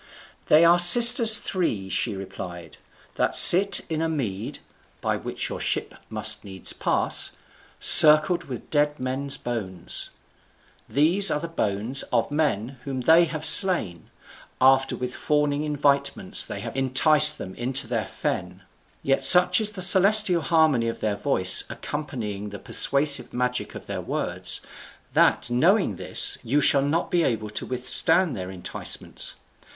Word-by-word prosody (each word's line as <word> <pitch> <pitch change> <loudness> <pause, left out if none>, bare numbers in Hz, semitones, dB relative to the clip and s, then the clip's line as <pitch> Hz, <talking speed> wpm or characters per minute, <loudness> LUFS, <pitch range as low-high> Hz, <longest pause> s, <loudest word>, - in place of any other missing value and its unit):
"They 160 +2 +3
are 170 +1 +3
sisters 225 +4 +8
three," 120 - -4
she 105 +2 -2
replied, 90 -3 -11 0.4
"that - - -2
sit 195 +2 +7
in 160 -1 -5
a 165 - -3
mead 110 -10 -6 0.4
(by - - -3
which - - -5
your - - -8
ship - - -4 0.2
must - - -2
needs 95 -2 -3
pass) - - -1 0.5
circled 155 +3 +7
with 125 -3 -11
dead 150 0 -2
men's 135 +2 -3
bones. 100 -8 -6 0.8
These 175 +8 +1
are 150 - -2
the 170 - -8
bones 115 -4 -2
of - - -2
men 135 -5 -4
whom 135 -2 -7
they 165 +6 +3
have 155 -1 -7
slain, 160 - 0 0.5
after 135 +1 +1
with 125 0 -7
fawning 150 -1 -3
invitements 140 -6 -2
they - - -9
have - - -9
enticed 150 +3 +3
them 95 - -10
into 130 +4 -1
their 115 -3 -5
fen. 90 +1 -7 0.4
Yet 135 0 -2
such 180 +2 +6
is 215 - 0
the 195 -3 -4
celestial 190 -1 +4
harmony 155 -6 0
of 115 - -6
their 105 -2 -4
voice 95 -8 +1
accompanying 110 -9 -8
the 100 - -10
persuasive 140 +3 0
magic 125 0 -5
of - - -11
their - - -7
words, - - -5 0.5
that, - - 0
knowing 165 - 0
this, - - 0
you 140 +6 -2
shall 140 -1 +2
not 150 +5 -4
be 175 - 0
able 110 -8 -4
to 105 - -5
withstand 150 +6 0
their 95 -1 -8
enticements. 95 -2 -6
140 Hz, 145 wpm, -22 LUFS, 115-165 Hz, 0.8 s, sisters